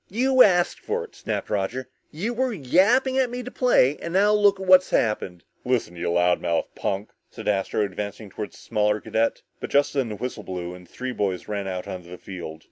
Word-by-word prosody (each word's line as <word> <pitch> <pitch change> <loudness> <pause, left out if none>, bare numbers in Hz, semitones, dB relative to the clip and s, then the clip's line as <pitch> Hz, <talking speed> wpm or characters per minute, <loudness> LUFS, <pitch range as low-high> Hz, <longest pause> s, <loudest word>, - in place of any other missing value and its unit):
"You 255 +5 +3
asked 180 -5 +4
for 460 +2 -2
it," 455 - -13
snapped 105 -3 -4
Roger, 105 +6 -2 0.2
"you 205 +10 -3
were 255 +1 0
yapping 225 - +3
at 260 -2 +2
me 245 +1 -5
to 250 - -7
play, 150 - +3
and 170 - -6
now 205 +3 +4
look 205 -1 +4
what's 185 -1 +5
happened!" 95 -6 0 0.2
"Listen, 125 -8 -1
you 85 0 -2
loudmouthed 85 -1 +1
punk!" 100 +2 -3 0.2
said - - -9
Astro, 100 +1 0
advancing 100 +1 -5
toward 105 +2 -6
the - - -15
smaller 105 0 0
cadet, 115 +2 -1 0.2
but - - -5
just 145 0 +2
then 135 -5 0
the 105 - -4
whistle 120 0 -5
blew 90 -2 -5
and 90 0 -13
the - - -27
three 130 0 -4
boys 95 -6 -2
ran 100 -2 -3
out 90 -1 -4
onto 90 -2 -7
the 90 - -8
field. 85 -5 -8
115 Hz, 210 wpm, -24 LUFS, -, 0.2 s, what's